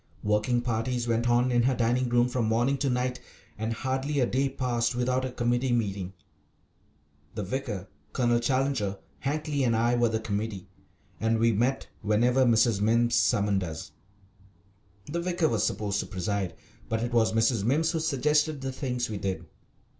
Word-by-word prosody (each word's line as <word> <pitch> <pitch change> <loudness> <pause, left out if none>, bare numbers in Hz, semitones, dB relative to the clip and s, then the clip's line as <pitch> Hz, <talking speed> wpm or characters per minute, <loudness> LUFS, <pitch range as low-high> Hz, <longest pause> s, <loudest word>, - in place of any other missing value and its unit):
Working 105 +4 +1
parties 120 +1 -1
went 115 +1 +1
on 120 +1 +3
in 120 -1 +3
her 130 +2 +2
dining 120 +2 +1
room 120 0 +3
from 125 -2 -1
morning 120 +5 +2
to 140 0 +1
night, 125 0 -1 0.4
and 110 +2 -3
hardly 135 +4 -1
a 125 - +4
day 135 +3 0
passed 120 -2 -1
without 125 +1 0
a 130 - -4
committee 120 +1 0
meeting. 100 -5 -1 1.2
The 105 - -3
vicar, 105 -3 -4 0.2
Colonel 120 -2 +2
Challenger, 130 -5 0 0.2
Hankly, 145 0 -1
and 115 -2 +2
I 120 +2 +2
were 120 -1 +3
the 110 0 -1
committee, 105 -3 -4 0.5
and 115 0 +1
we 115 +1 +3
met 120 +5 0
whenever 120 +5 +3
Mrs. 115 -3 +3
Mimms 115 +2 +3
summoned 100 -1 +2
us. 80 -2 -6 1.1
The 170 +3 -3
vicar 175 -2 +1
was 115 -6 0
supposed 100 -1 -2
to - - -3
preside, 95 -1 -2 0.3
but 115 -1 -1
it 120 0 -3
was 115 -2 +3
Mrs. 115 -1 +2
Mimms 155 +8 +2
who 165 - -1
suggested 150 0 +1
the 135 0 -3
things 125 -2 -2
we 105 - -4
did. 95 -4 -3
120 Hz, 170 wpm, -28 LUFS, 110-130 Hz, 1.2 s, a